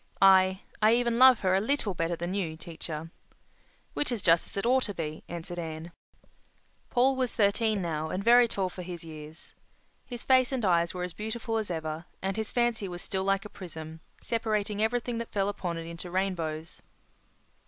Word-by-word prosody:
I—I 190 Hz, +3 st, +4 dB
even 235 Hz, -1 st, +1 dB
love 255 Hz, -2 st, +8 dB
her 185 Hz, -1 st, +2 dB
a 190 Hz, -, +3 dB
little 225 Hz, -3 st, 0 dB
better 165 Hz, 0 st, -1 dB
than 175 Hz, +2 st, -4 dB
you, 170 Hz, -6 st, -2 dB
teacher." 160 Hz, -1 st, -7 dB, 0.8 s
"Which 290 Hz, -, -1 dB
is 230 Hz, -5 st, -2 dB
just 165 Hz, -1 st, +4 dB
as -, -, -7 dB
it 195 Hz, -, -1 dB
ought 260 Hz, +2 st, +4 dB
to 205 Hz, -, -4 dB
be," 155 Hz, -2 st, -5 dB
answered 175 Hz, +1 st, -5 dB
Anne. 160 Hz, 0 st, -6 dB, 1.0 s
Paul 260 Hz, +2 st, +3 dB
was 255 Hz, -2 st, -1 dB
thirteen 210 Hz, -1 st, +2 dB
now 160 Hz, -2 st, -2 dB
and 190 Hz, +4 st, -3 dB
very 240 Hz, +2 st, +7 dB
tall 195 Hz, -4 st, -1 dB
for 180 Hz, 0 st, -7 dB
his 175 Hz, -2 st, -7 dB
years. 155 Hz, 0 st, -11 dB, 0.5 s
His 245 Hz, -3 st, -7 dB
face 255 Hz, -1 st, +4 dB
and 255 Hz, -5 st, -1 dB
eyes 170 Hz, -1 st, +2 dB
were 180 Hz, -, -3 dB
as 180 Hz, -1 st, -4 dB
beautiful 225 Hz, +1 st, -3 dB
as 215 Hz, -3 st, -2 dB
ever, 160 Hz, -1 st, -4 dB
and 195 Hz, 0 st, -2 dB
his 220 Hz, -1 st, -2 dB
fancy 240 Hz, -4 st, 0 dB
was 175 Hz, -1 st, -6 dB
still 190 Hz, -1 st, -2 dB
like 195 Hz, +1 st, +1 dB
a -, -, -7 dB
prism, 160 Hz, -4 st, -8 dB, 0.2 s
separating 215 Hz, -2 st, -1 dB
everything 235 Hz, +1 st, 0 dB
that 230 Hz, -, -6 dB
fell 200 Hz, -1 st, +1 dB
upon 180 Hz, -4 st, -3 dB
it 165 Hz, -, -5 dB
into 170 Hz, +1 st, -7 dB
rainbows. 170 Hz, -4 st, -2 dB
190 Hz, 185 wpm, -29 LUFS, 170-225 Hz, 1.0 s, love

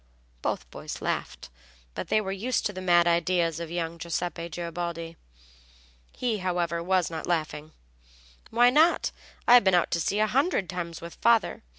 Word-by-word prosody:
Both -, -, -2 dB
boys -, -, -7 dB
laughed; -, -, -4 dB, 0.4 s
they 215 Hz, -, 0 dB
were 195 Hz, -3 st, -3 dB
used 225 Hz, +6 st, -1 dB
to 205 Hz, -, -1 dB
the 185 Hz, -, -6 dB
mad 175 Hz, -2 st, +4 dB
ideas 170 Hz, -1 st, +1 dB
of 170 Hz, -1 st, -5 dB
young 170 Hz, -1 st, -3 dB
Giuseppe 170 Hz, 0 st, -3 dB
Garibaldi. 170 Hz, 0 st, -5 dB, 1.0 s
He, 235 Hz, -4 st, -2 dB
however, 175 Hz, -2 st, -1 dB
was 180 Hz, -1 st, +1 dB
not 160 Hz, -1 st, -5 dB
laughing. 155 Hz, -2 st, -2 dB, 0.8 s
"Why 240 Hz, +2 st, +5 dB
not? 315 Hz, +5 st, +4 dB, 0.4 s
I've 245 Hz, -1 st, +8 dB
been 190 Hz, -2 st, +4 dB
out 175 Hz, -, +2 dB
to 170 Hz, -, +1 dB
sea 200 Hz, -, 0 dB
a 215 Hz, -, +3 dB
hundred 250 Hz, -, +1 dB
times 170 Hz, -2 st, -5 dB
with 170 Hz, 0 st, -10 dB
father. 230 Hz, -2 st, +3 dB
175 Hz, 160 wpm, -27 LUFS, 170-205 Hz, 1.0 s, I've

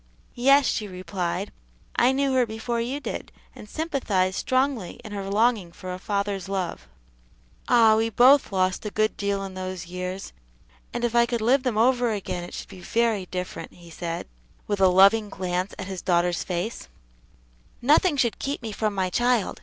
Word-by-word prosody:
"Yes," 275 Hz, +3 st, +5 dB
she 215 Hz, -2 st, -1 dB
replied, 185 Hz, +1 st, -4 dB, 0.4 s
"I 245 Hz, +2 st, +4 dB
knew 270 Hz, 0 st, +1 dB
her 255 Hz, -2 st, +3 dB
before 225 Hz, +2 st, -3 dB
you 255 Hz, +5 st, -3 dB
did, -, -, -6 dB, 0.2 s
and 210 Hz, -, -12 dB
sympathized 215 Hz, -, 0 dB
strongly 255 Hz, -7 st, 0 dB
in 215 Hz, -, -9 dB
her 200 Hz, -1 st, -4 dB
longing 210 Hz, -3 st, +2 dB
for 185 Hz, +1 st, -7 dB
a 180 Hz, -, -6 dB
father's 200 Hz, -1 st, -2 dB
love." 190 Hz, -3 st, -3 dB, 0.8 s
"Ah! 225 Hz, -3 st, +6 dB
we 225 Hz, +1 st, +1 dB
both 255 Hz, +5 st, +5 dB
lost 185 Hz, -1 st, 0 dB
a 210 Hz, -, -3 dB
good 215 Hz, +1 st, 0 dB
deal 200 Hz, -1 st, -1 dB
in 195 Hz, -1 st, -6 dB
those 185 Hz, -1 st, -5 dB
years, 180 Hz, +2 st, -6 dB, 0.6 s
and 240 Hz, -, -4 dB
if 240 Hz, -1 st, 0 dB
I 235 Hz, 0 st, +4 dB
could 235 Hz, -1 st, -1 dB
live 250 Hz, +5 st, +3 dB
them 250 Hz, -5 st, -1 dB
over 245 Hz, +1 st, +3 dB
again 195 Hz, -4 st, -3 dB
it 175 Hz, -, -8 dB
should -, -, -7 dB
be 190 Hz, -2 st, -11 dB
very 225 Hz, -2 st, 0 dB
different," 180 Hz, 0 st, -6 dB
he 170 Hz, -1 st, -15 dB
said, 170 Hz, 0 st, -5 dB, 0.4 s
with 205 Hz, -2 st, -2 dB
a 190 Hz, -, +7 dB
loving 200 Hz, +4 st, +5 dB
glance 185 Hz, 0 st, -3 dB
at 190 Hz, -, -5 dB
his 190 Hz, -2 st, -6 dB
daughter's 175 Hz, -2 st, +1 dB
face; 180 Hz, +5 st, -4 dB, 0.9 s
"nothing 295 Hz, +5 st, +4 dB
should 240 Hz, -4 st, +1 dB
keep 275 Hz, -2 st, -3 dB
me 225 Hz, -, -4 dB
from 210 Hz, 0 st, -1 dB
my 185 Hz, -1 st, 0 dB
child. 240 Hz, 0 st, +1 dB
205 Hz, 180 wpm, -25 LUFS, 185-240 Hz, 0.9 s, a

